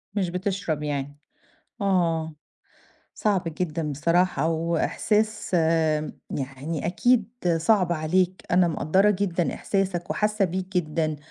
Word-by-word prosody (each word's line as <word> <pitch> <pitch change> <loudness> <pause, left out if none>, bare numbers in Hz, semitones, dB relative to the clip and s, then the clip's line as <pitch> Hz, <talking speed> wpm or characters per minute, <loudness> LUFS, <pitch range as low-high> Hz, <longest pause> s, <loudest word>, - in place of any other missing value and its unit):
مش 190 -4 0
بتشرب 180 -4 -2
يعني؟ 145 -1 -3 0.6
آه 165 -5 +1 0.8
صعب 200 -4 +1 0.2
جدًا 155 -3 -1
بصراحة 170 +3 +2
وإحساس 205 +6 0
آآ 160 -2 +2 0.2
يعني 140 +4 -4
أكيد 225 +4 +2 0.3
صعب 180 +1 +3
عليك 180 +3 0
أنا 175 0 +4
مقدرّة 185 +6 +3
جدًا 185 -4 0
إحساسك 195 -3 -2
وحاسة 210 -1 +1
بيه 185 +1 -2
جدًا 155 -2 0
175 Hz, 105 wpm, -25 LUFS, 160-195 Hz, 0.8 s, أنا